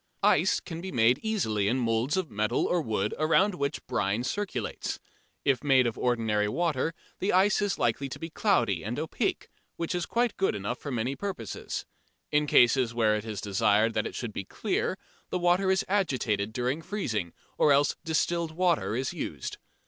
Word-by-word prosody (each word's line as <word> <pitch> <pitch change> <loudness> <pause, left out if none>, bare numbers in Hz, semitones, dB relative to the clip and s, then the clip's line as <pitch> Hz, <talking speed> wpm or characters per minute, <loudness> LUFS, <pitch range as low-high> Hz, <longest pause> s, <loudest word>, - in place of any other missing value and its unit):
Ice - - +4
can 165 -2 -7
be 190 +1 -5
made 120 +1 +4
easily 110 - 0
in 120 +5 +2
moulds 120 +5 +1
of 185 -8 -2
metal 105 +3 0
or 175 - +1
wood 105 -6 -1
around 175 +6 +3
which 140 -5 -3
brine 100 +4 0
circulates. 130 - -3 0.5
If 135 -4 +2
made 135 -3 +5
of 115 - -1
ordinary 110 -4 +1
water 165 +4 0 0.2
the 195 - +1
ice 195 +3 +4
is 205 -1 0
likely 125 +4 0
to - - -6
be 165 0 -7
cloudy 120 - +2
and 115 +4 -3
opaque, 155 +1 -2 0.3
which 170 +1 -3
is 175 -2 -2
quite 240 -1 0
good 190 - +1
enough 105 +5 -3
for 145 - -6
many 125 +1 -1
purposes. 190 - -5 0.5
In 150 0 +2
cases 120 -2 +4
where 110 -2 +3
it 105 0 -4
is 105 -3 -4
desired 105 +3 +2
that 110 - 0
it - - -8
should 115 -4 -4
be 100 - -4
clear, - - -2 0.3
the - - -1
water 180 +2 +2
is 190 0 +2
agitated 125 - 0
during 125 +6 -1
freezing, 115 - -3 0.3
or 150 - +5
else 140 +1 +4
distilled 165 +1 0
water 160 - +1
is 130 +1 -2
used. - - -5
130 Hz, 180 wpm, -28 LUFS, 110-175 Hz, 0.5 s, made